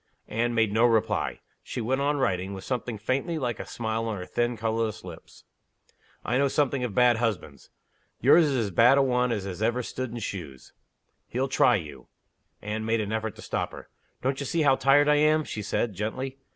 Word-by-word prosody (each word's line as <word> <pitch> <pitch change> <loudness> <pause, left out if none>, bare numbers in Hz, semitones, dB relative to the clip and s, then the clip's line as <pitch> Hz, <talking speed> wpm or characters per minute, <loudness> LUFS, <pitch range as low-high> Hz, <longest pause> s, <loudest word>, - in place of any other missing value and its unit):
Anne 120 +2 -1
made 110 -3 +2
no 115 +2 +3
reply. 115 -3 +1 0.2
She - - -6
went 130 +4 0
on 145 +1 +1
writing, 95 -7 -1
with 95 - -8
something 125 -3 -3
faintly 135 - -1
like 125 -5 -2
a - - -6
smile 115 -1 -3
on 110 -2 -3
her 90 - -6
thin, 120 +3 -1
colorless 110 0 -2
lips. 85 -3 -12 0.8
"I 125 - +1
know 140 - +3
something 140 -2 0
of 115 -6 -3
bad 125 -2 +5
husbands. 110 -5 -3 0.5
Yours 170 -1 +6
is 140 -3 0
as 110 -5 -1
bad 120 +8 +5
a 140 - +5
one 125 -1 +1
as 100 -3 -4
ever 120 +3 +1
stood 130 +2 -4
in 120 - -7
shoes. 85 - -7 0.5
He'll 130 +3 -1
try 130 - +4
you." 75 -9 -7 0.6
Anne 105 +1 -3
made 115 +1 +1
an 105 -1 -3
effort 110 -1 -2
to - - -11
stop - - -3
her. - - -11 0.3
"Don't 135 +1 0
you 140 - -3
see 165 +3 +1
how 135 -2 +5
tired 140 +2 +4
I 150 0 +4
am?" 155 +1 +3
she 110 - -5
said, 105 +2 -1
gently. 130 +7 -4
120 Hz, 205 wpm, -27 LUFS, 110-130 Hz, 0.8 s, Yours